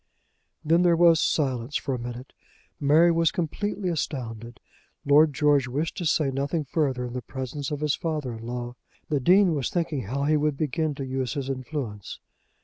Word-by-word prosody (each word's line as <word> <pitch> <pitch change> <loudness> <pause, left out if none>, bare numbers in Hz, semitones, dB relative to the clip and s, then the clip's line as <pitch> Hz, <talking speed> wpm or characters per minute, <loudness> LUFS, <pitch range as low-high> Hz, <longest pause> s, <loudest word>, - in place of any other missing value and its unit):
Then 165 +3 +4
there 175 -1 +4
was 165 -1 +5
silence 130 -2 0
for 135 - -3
a 125 - -3
minute. 120 +2 -7 0.5
Mary 155 +4 +5
was 165 -1 +3
completely 205 +2 -3
astounded. 120 -8 -4 0.5
Lord 150 +2 +5
George 145 -2 +2
wished 145 +6 -2
to 175 - -1
say 150 -3 +2
nothing 140 +4 -1
further 135 -4 -1
in 120 - -6
the 125 - -3
presence 130 +2 -5
of 150 -1 -4
his 150 -1 +1
father 150 -7 -3
in 115 0 -9
law. 120 0 -4 0.4
The 150 -2 +1
Dean 180 +5 +5
was 140 -4 -1
thinking 160 - -2
how 135 +7 -2
he 155 +1 +3
would 150 -1 0
begin 155 +1 -1
to 135 - -5
use 130 -1 -3
his 135 -1 -2
influence. 130 -6 -5
145 Hz, 180 wpm, -26 LUFS, 130-160 Hz, 0.5 s, was